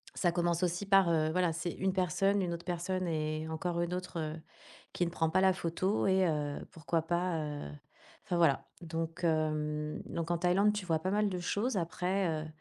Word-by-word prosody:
«Ça 175 - +2
commence 170 -1 +1
aussi 175 +3 0
par, 195 -3 +5
heu 155 -2 +2
voilà! 175 -1 +2
C'est 170 +1 -3
1 190 0 0
personne, 195 +2 +2
1 175 -1 -1
autre 170 0 -7
personne 180 +1 -2
et 155 -1 -2
encore 170 +2 -2
1 175 +1 -1
autre, 180 -2 -5
heu, 155 -1 -3 0.6
qui 175 - +1
ne 170 - -3
prend 165 -1 +1
pas 185 +3 +3
la 190 0 +5
photo, 185 +3 0
et 190 -1 +4
heu, 150 -2 -1
pourquoi 165 0 -1
pas, 175 +1 0
heu, 145 - -5 0.6
enfin, 180 - -1
voilà!» 160 -5 +3
donc 165 0 -4
hem, 155 -2 0
donc 165 -1 -3
en 175 - +2
Thaïlande, 190 +4 +3
tu 205 -3 -4
vois 165 -3 +1
pas 185 +4 -2
mal 210 0 +2
de 180 -2 -3
choses 205 +6 -1
après, 180 +2 0 0.2
heu, - - -7
170 Hz, 205 wpm, -32 LUFS, 160-185 Hz, 0.6 s, par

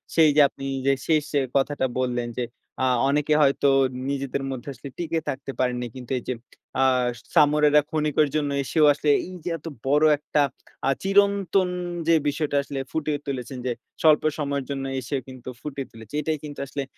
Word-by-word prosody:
সেই 160 -2 +6
যে 150 - +7
আপনি 135 - -12 0.2
যে 140 - +5
শেষ 155 -2 +3 0.3
কথাটা 140 0 +1
বললেন 120 -2 -1
যে, 125 - 0 0.4
"আ - - +4 0.2
অনেকে 150 +1 +2
হয়তো 140 0 +4 0.4
নিজেদের 140 -1 -2
মধ্যে 130 0 -6
আসলে 135 +2 -9
টিকে 165 -1 -1
থাকতে 135 0 -4
পারেননি।" 125 -1 0
কিন্তু 125 -1 -9
এইযে 125 - -4 0.5
আ - - +5 0.5
সামুরাইরা 150 0 +5
খনিকের 150 -1 +2
জন্য 145 -2 +1
এসেও 155 +3 +3
আসলে 145 +1 -1 0.2
এইযে 180 -1 -6
এত 155 - -21 0.2
বড় 150 +3 +4
একটা 150 0 0 0.5
আ - - +4
চিরন্তন 195 -1 +3 0.4
যে 165 - +5
বিষয়টা 145 0 -1
আসলে 140 -1 -5
ফুটিয়ে 150 -2 -1
তুলেছেন 130 -1 -4
যে 125 - 0 0.3
স্বল্প 155 -2 +5
সময়ের 140 -2 -2
জন্য 135 -1 -3
এসে 130 +3 -4
কিন্তু 130 -1 -9
ফুটিয়ে 140 -3 -5
তুলেছে। 110 0 -14
এটাই 155 +1 -1
কিন্তু 145 -1 -7
আসলে 140 +1 -3
145 Hz, 165 wpm, -24 LUFS, 135-155 Hz, 0.5 s, যে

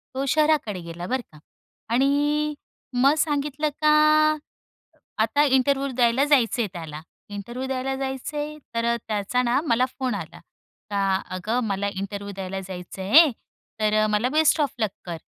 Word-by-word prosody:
तो 270 +1 -1
शहराकडे 300 -9 +2
गेला, 170 +1 -7
बरं 260 +3 -1
का? 155 - -16 0.5
आणि 290 +4 +2 0.4
मग 265 +3 +4
सांगितलं 295 0 0
का 305 0 +5 1.3
आता 255 +7 +2
इंटरव्ह्यु 275 0 +2
द्यायला 240 +2 +3
जायचंय 245 -5 +2
त्याला. 160 -4 -7 0.3
इंटरव्ह्यु 235 +6 -6
द्यायला 265 0 -2
जायचंय, 280 +3 -4 0.2
तर 235 0 +1
त्याचा 215 +3 0
ना 245 +2 +2
मला 245 0 +3
फोन 255 -2 -1
आला, - - -7 0.5
का 195 -2 +1 0.2
"अगं, 215 +7 -1
मला 200 0 -1
इंटरव्ह्यु 200 +1 -5
द्यायला 190 0 -4
जायचं 185 0 -8
आहे, 290 - +7 0.5
तर 215 0 +2
मला 210 +4 +1
बेस्ट 310 +2 +3
ऑफ 285 - 0
लक 215 -2 +1 0.2
कर." 170 -2 -5
250 Hz, 140 wpm, -24 LUFS, 200-280 Hz, 1.3 s, आहे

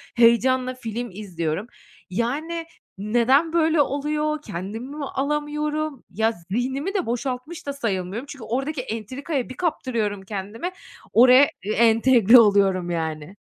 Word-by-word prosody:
heyecanla 250 +2 +4
film 240 0 -5
izliyorum. 180 -1 -4 0.4
Yani 300 - -2 0.3
neden 240 - +2
böyle 320 -2 +3
oluyor, 300 +2 -1
kendimi 220 - -6
mi 290 - -3
alamıyorum? 295 +1 -2
Ya, 220 +4 +1 0.2
zihnimi 265 - -1
de 380 -4 0
boşaltmış 255 +7 -4
da 280 - -2
sayılmıyorum 210 -2 -3
çünkü 275 -4 -10
oradaki 270 +3 -2
entrikaya 255 +4 -4
bir 255 - -9
kaptırıyorum 235 - -1
kendimi, 205 - -5 0.4
oraya 255 +3 +8
ı 245 - -9
entegre 230 0 +5
oluyorum, 195 -4 +3
yani. 160 +1 -4
250 Hz, 120 wpm, -23 LUFS, 210-290 Hz, 0.4 s, oraya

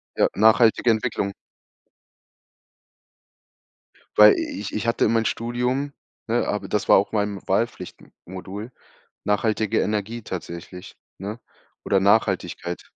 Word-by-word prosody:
Ja, - - +3
nachhaltige 110 +2 +4
Entwicklung. 110 -3 0 2.8
Weil 105 0 +9
i - - -1
i - - -5
ich 105 - -6
ich 110 +2 -2
hatte 115 - +2
in 110 - +2
mein 115 0 +2
Studium, 125 +5 -2 0.3
ne, 120 +1 0
aber 105 - -2
das 105 0 -2
war - - +8
auch 100 - 0
meinem 105 -2 -1
Wahlpflichtmodul, 95 +5 -4 0.5
nachhaltige 105 0 +1
Energie 105 +2 -2
tatsächlich, 90 0 -8 0.2
ne, 105 +5 -6 0.5
oder 100 - +3
Nachhaltigkeit. 95 -3 +1
105 Hz, 115 wpm, -23 LUFS, 100-115 Hz, 2.8 s, Weil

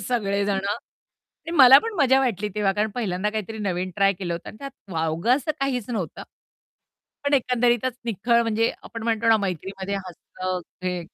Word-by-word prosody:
सगळेजण. 200 -3 0 0.8
आणि 330 - -6
मला 265 0 +10
पण 455 +4 -4
मजा 265 0 +5
वाटली 210 -5 -1
तेव्हा, 205 -2 +1
कारण 210 +2 0
पहिल्यांदा 210 -4 -1
काहीतरी 220 +1 -4
नवीन 185 -3 -2
ट्राय 195 -1 +4
केलं 175 -2 -4
होतं 170 - -8
आणि - - -15
त्यात 275 -1 -7 0.2
वावगं 165 +9 +1
असं 290 +2 -3
काहीच 255 -5 -1
नव्हतं. 200 -8 -4 1.0
पण 285 0 +2
एकंदरीतच 245 -1 +2
निखळ 235 +2 +2
म्हणजे 225 0 +1
आपण 230 - -8
म्हणतो 230 0 0
ना, 225 - +7
मैत्रीमध्ये 195 0 -4
हसणं 185 0 -5 0.3
हे, 180 -1 -1
210 Hz, 160 wpm, -24 LUFS, 190-245 Hz, 1.0 s, मला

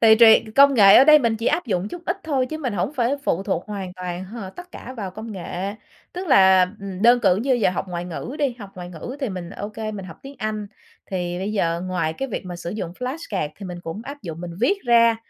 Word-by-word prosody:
Tùy, 220 -1 +7
tùy, 225 -1 +7
công 280 0 +7
nghệ 200 -5 +8
ở 260 - +8
đây 305 0 +8
mình 230 -4 +1
chỉ 225 - -4
áp 320 +1 +1
dụng 195 -3 -1
chút 345 +9 -8
ít 355 - 0
thôi, 275 -5 0
chứ 310 +4 -5
mình 260 -7 -2
hổng 205 +7 -1
phải 250 0 +1
phụ 180 - 0
thuộc 190 -3 -2
hoàn 195 -3 -5
toàn 180 0 -5
h 205 +5 -10 0.2
tất 355 0 -11
cả 255 - -9
vào 200 -4 -4
công 220 +4 -8
nghệ. 190 +1 -5 0.4
Tức 365 +1 -5
là, 190 -7 +6
ừm, 195 -1 -6
đơn 240 +1 +6
cử 180 - +4
như 255 +6 +1
giờ 230 -6 +2
học 185 - -3
ngoại 175 -1 -4
ngữ 180 - -6
đi, 275 -5 0
học 200 -3 -9
ngoại 180 -1 -8
ngữ 180 - -7
thì 270 - -1
mình 180 -3 -6
ô 205 +1 -6
kê 215 0 -5
mình 195 -3 -6
học - - -11
tiếng 275 +1 -10
Anh, 215 -1 -3 0.4
thì 175 -2 -2
bây 195 +3 -3
giờ 170 -5 0
ngoài 180 -4 -1
cái 270 +11 -4
việc 220 - -4
mà 175 -1 -6
sử 170 0 -6
dụng 180 -4 -4
flashcard 250 - -3
thì 200 - -7
mình 175 -1 -7
cũng 165 +4 -6
áp 285 0 -8
dụng 165 -3 -7
mình 175 0 -6
viết 320 +12 +3
ra. 230 -1 +5
210 Hz, 265 wpm, -22 LUFS, 180-250 Hz, 0.4 s, nghệ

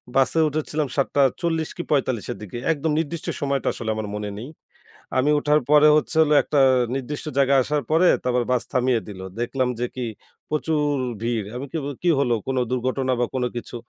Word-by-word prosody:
বাসে 135 +4 +3
উঠেছিলাম 150 0 -2
৭:৪০ 150 +4 +1
কি 175 - -3
৪৫-এর 130 -5 0
দিকে। 105 +3 -7
একদম 160 +1 -1
নির্দিষ্ট 165 0 -4
সময়টা 140 -1 -1
আসলে 115 -2 -5
আমার 110 -1 -4
মনে 105 0 -4
নেই। 120 +7 -7 0.7
আমি 130 +3 +3
উঠার 150 +1 +2
পরে 150 0 +7
হচ্ছে 155 +2 0
হলো 150 -1 +3
একটা 145 - 0 0.4
নির্দিষ্ট 135 +4 -4
জায়গায় 135 -1 +4
আসার 145 +1 -1
পরে, 165 +3 +5 0.2
তারপর 125 -1 +1
বাস 125 - +2
থামিয়ে 125 -3 +1
দিল। 100 -3 -9 0.2
দেখলাম 125 +2 0
যে, 125 - 0
কি 125 -1 -3 0.4
প্রচুর 155 0 0 0.4
ভিড়। 115 -3 -1
আমি 130 +3 -4
কেবল 145 -3 -3
কি 175 - +3
হলো 125 -4 +2
কোন 135 -1 -1
দুর্ঘটনা 130 +1 0
বা 120 - +2
কোন 125 - 0
কিছু 120 - -6
135 Hz, 175 wpm, -23 LUFS, 125-150 Hz, 0.7 s, পরে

